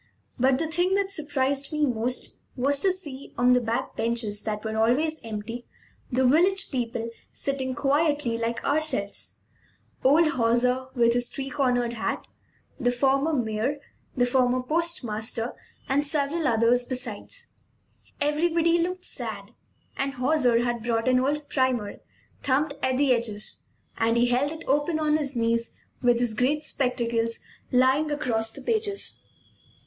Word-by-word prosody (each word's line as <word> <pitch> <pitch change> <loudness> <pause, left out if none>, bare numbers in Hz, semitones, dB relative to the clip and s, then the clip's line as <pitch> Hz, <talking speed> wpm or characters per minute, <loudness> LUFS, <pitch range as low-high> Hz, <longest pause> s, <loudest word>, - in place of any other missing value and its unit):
But 260 +1 +4
the 325 - -1
thing 350 +4 +1
that 395 -1 0
surprised 280 -4 -1
me 300 -1 +2
most 245 -1 -1 0.2
was 275 +2 +1
to 385 - +3
see, 295 -8 -6
on 245 +1 +5
the 250 - +4
back 235 +3 -2
benches 225 -2 -1
that 215 0 -4
were 220 0 -2
always 275 +8 +2
empty, 225 +2 -6 0.4
the 255 +1 +2
village 365 +9 +3
people 235 -3 -2 0.2
sitting 265 -2 -2
quietly 290 -2 +1
like 230 0 -2
ourselves; 280 -9 -1 0.6
old 305 +5 +5
Hauser, 250 0 +1
with 235 -1 +4
his 245 0 +1
three 275 0 -5
cornered 245 -4 +1
hat, 230 - -3 0.5
the 245 -2 +2
former 275 +4 +2
mayor, 240 0 0 0.4
the 245 - +4
former 250 0 +2
postmaster, 250 -7 -1 0.3
and 275 +2 +2
several 295 +2 0
others 235 +1 +3
besides. 255 - -6 0.7
Everybody 330 +3 +2
looked 365 +2 -2
sad; - - -5 0.5
and 275 0 -1
Hauser 250 -3 +2
had 240 -1 -1
brought 225 +1 0
an 255 0 +4
old 290 +3 -1
primer, 255 -6 0 0.4
thumbed 285 +2 +1
at 260 -1 +1
the 275 -2 +4
edges, 220 -3 -2 0.3
and 230 +1 +2
he 240 - +4
held 260 +4 +1
it 320 +1 -7
open 295 +4 +1
on 305 -1 +2
his 285 -3 -3
knees 230 0 0 0.3
with 245 -1 +3
his 240 -2 0
great 270 +7 +1
spectacles 235 -5 -1 0.3
lying 260 +4 +3
across 230 -7 0
the - - -10
pages. 430 -3 -2
260 Hz, 145 wpm, -26 LUFS, 235-295 Hz, 0.7 s, on